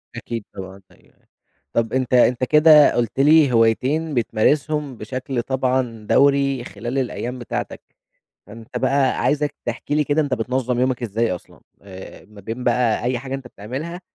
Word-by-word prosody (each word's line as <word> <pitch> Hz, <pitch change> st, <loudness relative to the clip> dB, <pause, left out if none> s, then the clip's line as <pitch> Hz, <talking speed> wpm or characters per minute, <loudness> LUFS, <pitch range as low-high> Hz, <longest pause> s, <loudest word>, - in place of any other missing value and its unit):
أكيد، 115 Hz, -3 st, -6 dB
طبعًا، 95 Hz, 0 st, -9 dB
أيوَه، -, -, -23 dB
أيوَه. -, -, -37 dB, 0.5 s
طب 115 Hz, 0 st, 0 dB
أنت 130 Hz, -1 st, -1 dB
أنت 125 Hz, 0 st, +4 dB
كده 150 Hz, +2 st, +6 dB
قلت 120 Hz, +1 st, -1 dB
لي 150 Hz, -1 st, +5 dB
هوايتين 130 Hz, +8 st, +1 dB
بتمارسهم 135 Hz, +3 st, 0 dB
بشكل 130 Hz, +3 st, -4 dB
طبعًا 125 Hz, -3 st, -2 dB
دوري 140 Hz, -2 st, +3 dB
خلال 120 Hz, +5 st, -6 dB
الأيّام 125 Hz, -1 st, -3 dB
بتاعتك. 120 Hz, -, -5 dB, 0.7 s
فأنت 115 Hz, +3 st, -8 dB
بقى 135 Hz, +1 st, +1 dB
عايزك 150 Hz, 0 st, 0 dB
تحكي 120 Hz, +5 st, -3 dB
لي 150 Hz, -, +2 dB
كده 145 Hz, +2 st, +1 dB
أنت 140 Hz, -3 st, -1 dB
بتنظم 125 Hz, +1 st, -2 dB
يومك 130 Hz, -1 st, 0 dB
إزاي 115 Hz, 0 st, -1 dB
أصلًا؟ -, -, -13 dB, 0.2 s
آآ، 95 Hz, -1 st, -11 dB
ما 105 Hz, -1 st, -15 dB
بين 115 Hz, +5 st, -6 dB
بقى 120 Hz, -2 st, +1 dB
أي 125 Hz, 0 st, 0 dB
حاجة 135 Hz, +1 st, -6 dB
أنت 135 Hz, -2 st, -6 dB
بتعملها 135 Hz, -, -7 dB
125 Hz, 155 wpm, -21 LUFS, 115-140 Hz, 0.7 s, كده